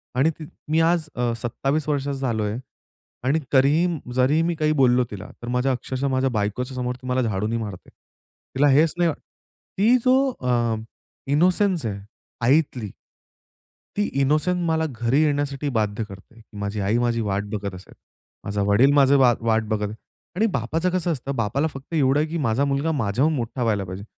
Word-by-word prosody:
आणि 140 +5 +3
ती 155 - -7 0.3
मी 160 - +3
आज 165 -1 +2
अ, 120 -1 0
27 135 +6 -1
वर्षाचा 140 -1 -1
झालोय 110 -5 -1 0.7
आणि 140 +5 +2
तरीही 145 +6 +4 0.3
जरीही 135 +5 +3
मी 170 0 0
काही 155 0 +1
बोललो 125 0 +4
तिला 100 - -7
तर 120 - -7
माझ्या 125 +2 +1
अक्षरशः 130 +2 -2
माझ्या 130 0 +1
बायकोच्या 110 +5 -2
समोर 125 0 -2
मला 130 0 0
ती 115 - 0
झाडूनी 105 +3 -1
मारते. 105 -5 -7 0.7
तिला 145 +2 +4
हेच 150 +4 +4
ना 175 -2 +3 0.7
ती 225 +6 +5
जो 255 +1 +5 0.3
अ 120 -2 +1 0.6
इनोसेन्स 180 - +2
आहे 100 -2 -3 0.5
आईतील 130 -6 +2 1.1
ती 205 - +2 0.2
इनोसन्स 155 +6 +1
मला 160 0 +1
घरी 120 +5 +1
येण्यासाठी 145 -1 -1
बाध्य 105 +1 -1
करते. 105 +3 -13 0.2
माझी 100 +1 -3
आई 100 +4 +1
माझी 120 -1 +1
वाट 100 -1 -1
बघत 100 -2 -3
असेल. 90 - -13 0.5
माझा 100 0 -2
वडील 110 +7 +4
माझं 140 -1 +5
वा 125 -3 +5
वाट 115 -1 +1
बघत 105 -1 -2 0.4
आणि 215 +5 +2
बापाचं 160 - -1
कसं 180 -1 0
असतं, 140 -1 -4
बापाला 120 +8 0
फक्त 135 +2 -10
एवढं 140 -2 +3
आहे 155 - +1
की 165 +2 -3
माझा 135 0 +1
मुलगा 140 +3 0
माझ्याहून 130 +3 +1
मोठा 120 0 -3
व्हायला 105 -4 +1
पाहिजे 95 +2 -7
130 Hz, 170 wpm, -23 LUFS, 115-150 Hz, 1.1 s, ती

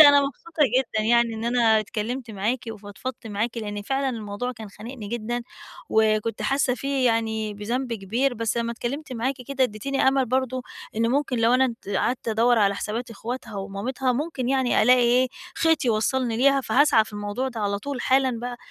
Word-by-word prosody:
أنا 285 -2 +9
مبسوطة 300 +4 -2 0.2
جدًا 230 -4 -1
يعني 235 0 +3
إن 220 +1 -5
أنا 235 -2 +4
اتكلّمت 225 +3 -4
معاكِ 215 +5 -1
وفضفضت 220 +4 -7
معاكِ 225 +3 -2
لإن 205 -2 -4
فعلًا 270 +5 0
الموضوع 225 0 -4
كان 220 -3 -9
خانقني 215 +2 -9
جدًا، 240 +2 -3 0.5
وكنت 220 0 +1
حاسّة 270 -2 +1
فيه 275 -1 0
يعني 220 -2 0
بذنب 235 +5 -3
كبير، 230 +6 0
بس 230 0 -1
لمّا 235 0 -1
اتكلّمت 260 +5 -5
معاكِ 250 +3 -1
كده 275 -1 +2
أدّيتيني 265 +4 0
أمل 265 -1 +2
برضه 260 +1 -1 0.3
إن 230 +1 +2
ممكن 270 -2 0
لو 230 +2 +4
أنا 265 +1 +4 0.2
د - - -9
قعَدت 245 +2 -1
أدوّر 230 +2 +3
على 200 -2 +3
حسابات 230 +4 -4
أخواتها 230 0 -6
ومامتها، 210 +7 -2
ممكن 265 -1 -2
يعني 265 -2 +2
ألاقي 250 +3 +6
إيه 245 +2 +4 0.3
خيط 325 -3 +2
يوصّلني 235 +1 +1
ليها 275 +3 +4
فهاسعى 270 -4 +4
في 215 - -13
الموضوع 205 +5 -3
ده 235 -4 -6
على 200 -1 0
طول 270 +4 -5
حالًا 260 -2 +2
بقى، 245 0 -4
240 Hz, 180 wpm, -24 LUFS, 220-260 Hz, 0.5 s, أنا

